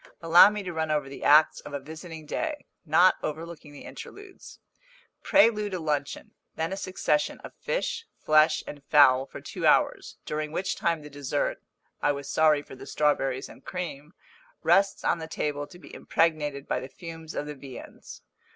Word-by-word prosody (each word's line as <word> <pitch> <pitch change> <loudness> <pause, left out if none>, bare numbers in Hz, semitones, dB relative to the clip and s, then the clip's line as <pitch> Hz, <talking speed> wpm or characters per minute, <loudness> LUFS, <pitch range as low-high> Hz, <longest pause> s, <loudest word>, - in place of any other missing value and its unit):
Allow 170 +4 +8
me 210 -1 -5
to 180 -2 -5
run 160 -1 -2
over 150 -2 0
the 135 - -9
acts 155 +2 +5
of 145 - -8
a - - -2
visiting 160 +2 -10
day, 300 - -3 0.2
not 175 +5 +5
overlooking 160 0 -6
the 145 - -12
interludes. 400 -1 -11 0.6
Prelude 210 -8 +3
a - - -3
luncheon 150 -3 -3 0.2
then 160 +3 -2
a - - -2
succession 150 -6 -1
of - - -10
fish, 465 -2 -3
flesh, 155 +1 +3
and 145 -1 -9
fowl 135 -3 +5
for - - -9
two - - -2
hours, - - +2
during 150 0 -3
which 190 +4 -2
time 165 -2 -1
the 150 - -10
dessert 145 0 -2 0.4
I 145 - +2
was 140 0 -7
sorry 155 -1 +3
for - - -12
the - - -11
strawberries 135 -3 0
and - - -15
cream 165 -4 -6 0.5
rests 195 0 +3
on 170 - +1
the 160 - -6
table 145 -2 -3
to 175 - -14
be 175 - -15
impregnated 150 -4 0
by - - 0
the 130 - -8
fumes 165 -1 -9
of - - -2
the 150 - -6
viands. 135 -2 -11
155 Hz, 180 wpm, -27 LUFS, 145-175 Hz, 0.6 s, Allow